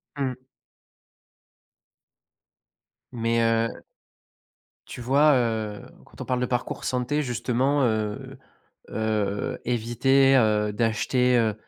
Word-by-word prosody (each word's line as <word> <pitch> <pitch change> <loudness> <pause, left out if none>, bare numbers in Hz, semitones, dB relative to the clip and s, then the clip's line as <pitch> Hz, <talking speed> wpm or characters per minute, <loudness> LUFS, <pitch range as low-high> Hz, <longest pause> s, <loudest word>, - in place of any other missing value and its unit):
Mmh. 135 -3 -2 2.8
Mais, 115 -1 +1
heu - - -14 1.0
tu - - -8
vois, 140 +5 +4
heu, 110 -4 -1 0.2
quand - - -14
on - - -5
parle 125 -1 -1
de 125 - 0
parcours 125 0 -3
santé, 130 +4 -1
justement, 130 +2 0
heu 110 -2 -3 0.5
heu, 105 -2 -2
éviter, 125 +3 +2
heu, 105 -3 +2
d'acheter, 120 +3 +1
heu 110 -2 +1
120 Hz, 100 wpm, -25 LUFS, 110-130 Hz, 2.8 s, vois